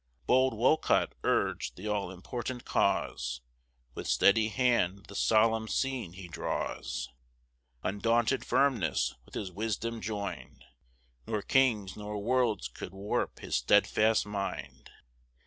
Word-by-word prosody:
Bold 130 -1 +3
Wolcott 130 +7 +3
urg'd - - 0
the 100 +4 -6
all 100 -3 -1
important 120 +6 -6
cause; - - 0 0.5
With - - -6
steady 110 +2 +4
hand 110 -5 +1
the - - -12
solemn 110 +1 +3
scene 130 -8 -1
he 95 -1 -9
draws; 75 -5 -3 0.7
Undaunted 115 +6 +1
firmness 135 -9 +2
with - - -14
his 95 -3 -4
wisdom 110 +3 -3
join'd, 100 -2 -5 0.6
Nor 105 -2 -2
kings 115 -8 +2
nor 105 0 -5
worlds 110 - +1
could 60 - -9
warp 100 +2 -2
his - - -1
stedfast 110 - +3
mind. 100 -1 -5
105 Hz, 115 wpm, -30 LUFS, 100-120 Hz, 0.7 s, steady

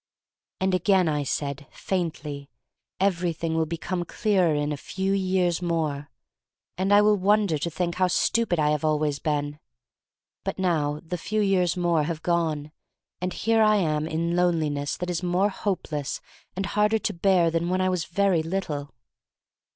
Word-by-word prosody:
And 190 0 +1
again 185 0 +3
I 150 -2 0
said 140 0 -3
— - - -37
faintly 150 -6 -4 0.3
— 115 0 -62
everything 170 -2 -2
will 160 0 +1
become 175 +2 -3
clearer 185 -4 +1
in 145 0 -1
a - - -1
few 190 +8 -2
years 185 -3 +1
more, 155 -4 -2 0.7
and 190 +2 -1
I 205 0 +7
will 210 0 +4
wonder 200 -4 +2
to 170 - -2
think 170 +1 -2
how 185 - +5
stupid 220 +1 +1
I 150 -1 +2
have 150 0 -1
always 150 -2 +1
been. 150 -1 -2 0.8
But - - -3
now 155 -5 0
the 180 +1 -4
few 215 +5 -2
years 185 -3 +2
more 170 -3 +2
have 165 -1 -4
gone 160 -4 0 0.5
and 180 0 -1
here 225 +3 +1
I 215 -1 +5
am 155 -5 0
in 170 +2 -1
loneliness 155 -5 0
that 180 0 -3
is 175 - -2
more 180 +3 +2
hope 195 -3 -3
less 145 -2 -3 0.4
and 190 +1 -2
harder 210 +2 +2
to 215 -1 -2
bear 175 -2 +3
than 170 +1 0
when 185 +1 +1
I 185 0 +2
was 180 -3 -1
very 190 -1 +2
little. 160 -5 -4
170 Hz, 175 wpm, -25 LUFS, 155-190 Hz, 0.8 s, I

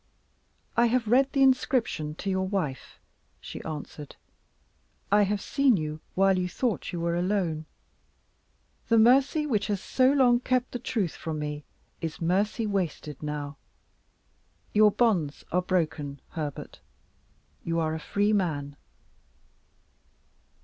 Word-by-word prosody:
"I 235 +1 +4
have 235 -1 +1
read 265 +4 +4
the 275 -2 +3
inscription 255 - +1
to 195 - -4
your 190 0 0
wife," 170 -9 -3 0.4
she - - -8
answered; 150 -1 -7 1.0
"I 205 +1 +6
have 205 0 +1
seen 275 0 +2
you 155 -1 -4 0.2
while 195 0 +4
you 180 0 -1
thought 235 +3 -2
you 175 - -4
were 170 0 0
alone; 175 -4 -1 1.2
the 230 - +5
mercy 270 +7 +4
which 215 -8 0
has 205 -2 -1
so 255 +6 +2
long 250 -4 +4
kept 255 0 0
the 245 - -4
truth 210 -8 -1
from 160 -1 -5
me 150 -1 -4 0.4
is 160 -2 -4
mercy 200 +6 0
wasted 175 -8 -3
now. 150 -1 -4 1.2
Your 210 0 +6
bonds 195 -10 0
are 180 - +2
broken, 155 -6 -1
Herbert. 150 -4 -6 0.8
You 165 0 -1
are 160 -1 0
a 160 - -3
free 205 +6 0
man." 145 -8 -1
190 Hz, 130 wpm, -27 LUFS, 155-230 Hz, 1.2 s, I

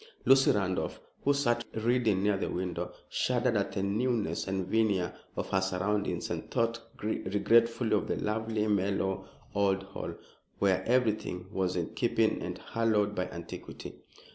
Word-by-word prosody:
Lucy 135 0 +6
Randolph, 95 -3 0 0.2
who 140 - +4
sat 120 -4 +2
reading 110 -3 +2
near 105 0 +3
the 95 - -2
window, 90 0 -3 0.2
shuddered 125 -1 +1
at 100 -1 0
the 95 - -1
newness 105 -4 0
and 95 -1 -1
veneer 100 -3 +1 0.2
of - - -3
her 95 - +3
surroundings 95 +2 -1
and - - -4
thought 115 0 +1 0.2
regretfully 115 +3 +2
of 105 - 0
the - - 0
lovely, 110 0 -1
mellow 95 -2 0 0.3
old 100 -1 +2
Hall, 95 0 -6 0.4
where 95 -2 +2
everything 110 -7 +1
was 95 -3 0
in 85 -2 -2
keeping - - +1
and - - -4
hallowed 110 -3 +1
by 90 -2 -2
antiquity. 85 -1 -8
105 Hz, 145 wpm, -30 LUFS, 95-115 Hz, 0.4 s, Lucy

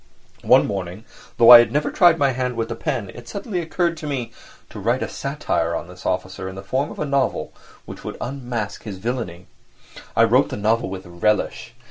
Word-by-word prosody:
One - - +5
morning, 95 +1 -5 0.3
though 115 +1 +8
I 120 - +13
had 120 -1 +3
never 150 +3 0
tried 175 -3 +5
my 140 -3 +2
hand 125 -1 -2
with 115 0 -2
the - - -3
pen, 100 -4 -3
it 120 -1 -12
suddenly 200 -2 -4
occurred 170 +1 -1
to 155 - -6
me 130 -5 -3 0.4
to - - -8
write 120 +6 0
a - - -2
satire 110 - -2
on 85 - -5
this 90 +1 -9
officer 95 +1 -3
in 95 - -9
the 95 - -8
form 130 +8 -1
of - - -10
a 150 - -2
novel 140 -2 -1 0.3
which - - -10
would - - -6
unmask 120 -5 -4
his 105 -4 -7
villainy. 95 -5 -4 0.7
I 115 - +5
wrote 125 +4 +4
the - - -5
novel 110 0 +1
with 95 0 -7
relish. 105 +6 -1
115 Hz, 205 wpm, -22 LUFS, 95-135 Hz, 0.7 s, I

